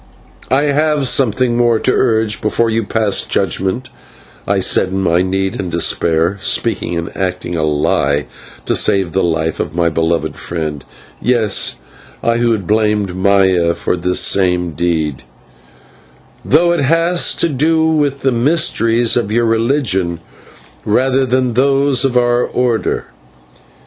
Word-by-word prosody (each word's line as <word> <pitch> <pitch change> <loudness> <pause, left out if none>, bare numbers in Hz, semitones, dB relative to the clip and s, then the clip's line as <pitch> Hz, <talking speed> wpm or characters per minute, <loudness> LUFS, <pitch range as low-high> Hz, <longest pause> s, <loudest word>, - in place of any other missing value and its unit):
"I 135 +3 +2
have 150 -1 +1
something 125 -1 +1
more 120 -1 +2
to 130 - 0
urge 110 -4 +1
before 115 +2 0
you 115 +1 0
pass 105 -1 0
judgment," 95 +7 -2 0.6
I - - +1
said - - +2
in 95 +1 -3
my 85 0 +2
need 95 +1 -2
and 90 -3 -4
despair 85 +2 0
(speaking 85 - -1
and 85 - -6
acting 90 -2 -3
a 80 - -1
lie 75 -1 0 0.4
to - - 0
save 95 -4 +1
the 95 - 0
life 80 -1 -1
of 75 - -4
my 85 -1 +1
beloved 80 +1 -1
friend 80 -4 -5 0.4
yes, 115 -5 +1 0.5
I 115 0 +1
who 120 0 +1
had 105 -5 -2
blamed 105 -2 0
Maya 95 -3 +2
for - - -2
this 90 +1 0
same 90 -3 +1
deed), 80 -4 -2 1.2
"though 170 +5 +3
it 175 - 0
has 165 +5 +2
to - - +1
do 160 +2 +1
with 145 -3 0
the 135 - +1
mysteries 120 -3 +1
of 115 -4 -1
your 120 +1 +1
religion 115 - 0 0.6
rather 130 +4 +1
than 130 0 +1
with 120 - -6
those 135 0 +2
of 125 -2 +1
our 120 0 +2
Order. 120 -3 -1
110 Hz, 145 wpm, -15 LUFS, 90-130 Hz, 1.2 s, though